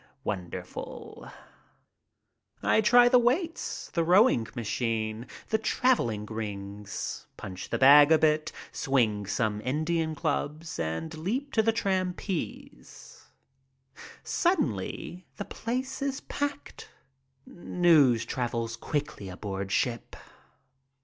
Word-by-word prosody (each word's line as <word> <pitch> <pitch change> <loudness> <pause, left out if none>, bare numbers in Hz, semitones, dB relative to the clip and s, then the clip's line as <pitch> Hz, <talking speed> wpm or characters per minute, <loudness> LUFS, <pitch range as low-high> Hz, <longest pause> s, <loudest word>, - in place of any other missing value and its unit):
Wonderful! 90 -4 -6 1.3
I - - +4
try 245 +3 +6
the 250 0 +6
weights, 320 +8 -1
the 170 - +2
rowing 175 - +4
machine, 115 -1 -2 0.2
the 220 - +2
traveling 120 - +1
rings, 105 -2 -6
punch 95 -1 -7
the - - 0
bag 145 +3 +8
a 160 - +7
bit, 155 0 +2 0.2
swing 110 -8 0
some 105 0 -1
Indian 160 +4 -1
clubs, 155 +1 -3
and 85 - -3
leap 240 - -3
to 220 - +4
the 225 +1 +3
trapeze. 185 -3 -4 1.0
Suddenly 180 - -1
the 205 - -4
place 255 +6 -4
is 275 -1 -2
packed. 285 0 -5 0.6
News 160 -10 +3
travels 115 -2 -3
quickly 145 -7 -4
aboard 95 +1 -5
ship. 120 +2 -1
150 Hz, 100 wpm, -28 LUFS, -, 1.3 s, bag